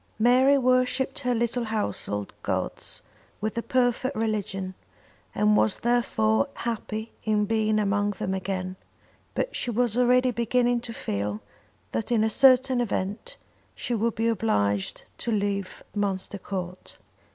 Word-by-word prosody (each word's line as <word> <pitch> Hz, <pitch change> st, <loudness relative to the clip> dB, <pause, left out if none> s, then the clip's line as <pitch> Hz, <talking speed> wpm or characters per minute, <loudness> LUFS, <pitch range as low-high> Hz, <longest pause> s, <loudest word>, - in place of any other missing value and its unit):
Mary 255 Hz, +5 st, +5 dB
worshipped 255 Hz, +2 st, +2 dB
her 250 Hz, -3 st, 0 dB
little 235 Hz, +1 st, 0 dB
household 105 Hz, -, -2 dB
gods -, -, -3 dB, 0.4 s
with 215 Hz, +2 st, -2 dB
a 235 Hz, -, 0 dB
perfect 255 Hz, +1 st, +1 dB
religion, 200 Hz, -4 st, -2 dB, 0.6 s
and 105 Hz, 0 st, +4 dB
was 105 Hz, 0 st, +2 dB
therefore 110 Hz, -, +2 dB
happy 225 Hz, -1 st, -4 dB
in 210 Hz, -1 st, +2 dB
being 215 Hz, 0 st, +1 dB
among 205 Hz, 0 st, +1 dB
them 190 Hz, -1 st, -3 dB
again; 185 Hz, -1 st, -3 dB, 0.6 s
but -, -, -1 dB
she -, -, -1 dB
was 240 Hz, -1 st, +1 dB
already 250 Hz, +1 st, +4 dB
beginning 240 Hz, +1 st, +1 dB
to 235 Hz, 0 st, -6 dB
feel 105 Hz, -, -3 dB, 0.5 s
that 225 Hz, -, -3 dB
in 225 Hz, -2 st, +3 dB
a 220 Hz, -, +1 dB
certain 260 Hz, 0 st, +5 dB
event 210 Hz, -, -3 dB, 0.4 s
she 245 Hz, -, -3 dB
would 230 Hz, 0 st, 0 dB
be 225 Hz, +2 st, +1 dB
obliged 100 Hz, -, 0 dB, 0.2 s
to 235 Hz, -, -1 dB
leave 200 Hz, -2 st, -2 dB
Munster 200 Hz, -1 st, -2 dB
Court. 185 Hz, -2 st, -6 dB
220 Hz, 135 wpm, -26 LUFS, 195-245 Hz, 0.6 s, Mary